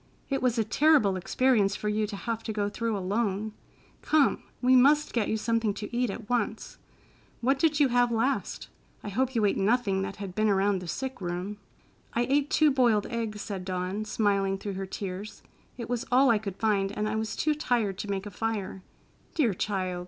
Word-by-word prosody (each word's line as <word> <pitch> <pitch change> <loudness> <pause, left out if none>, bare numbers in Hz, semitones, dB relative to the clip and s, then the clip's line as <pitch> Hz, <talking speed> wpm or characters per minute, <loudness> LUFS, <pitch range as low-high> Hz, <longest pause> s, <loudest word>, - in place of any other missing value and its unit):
It 270 - 0
was 250 -2 +1
a 225 - +3
terrible 240 -2 +3
experience 205 +1 +2
for 210 - -4
you 210 0 0
to 205 - -6
have 225 +2 -3
to 220 - -2
go 205 -1 -1
through 230 0 -2
alone. 205 +2 -1 0.5
Come, 300 -3 +3 0.2
we 255 +1 +4
must 290 +4 +4
get 230 -4 +1
you 220 - 0
something 225 -1 0
to 210 +3 -6
eat 245 -1 +1
at 205 +2 -6
once. 225 -2 -2 0.6
What 270 +3 +2
did 310 -1 +2
you 285 -3 +5
have 245 0 +3
last? 235 +4 -1 0.4
I - - -5
hope 260 +5 -1
you 220 -2 +3
ate 200 - +1
nothing 200 -2 +2
that 195 0 -4
had 200 -3 -7
been 215 +2 +1
around 195 0 +2
the 180 - -7
sick 265 +4 -4
room." 180 +3 -4 0.6
"I 235 - +2
ate 280 +3 +1
two 305 -1 +4
boiled 240 -6 +3
eggs," 220 -3 -3
said 195 -3 -5
Dawn, 185 +2 -3
smiling 200 -3 +1
through 200 0 -5
her 190 0 -4
tears. 195 +2 -6 0.3
"It 235 - -5
was 245 0 -2
all 260 0 +5
I 220 - +3
could 200 -3 -5
find, 200 -2 +1
and 210 +1 -2
I 215 - -2
was 220 0 -2
too 305 - +1
tired 235 -10 -1
to 205 - -5
make 195 0 -2
a 205 - -7
fire." 200 -2 -3 0.5
"Dear 255 -10 +2
child!" 185 -2 -2
215 Hz, 205 wpm, -28 LUFS, 195-245 Hz, 0.6 s, you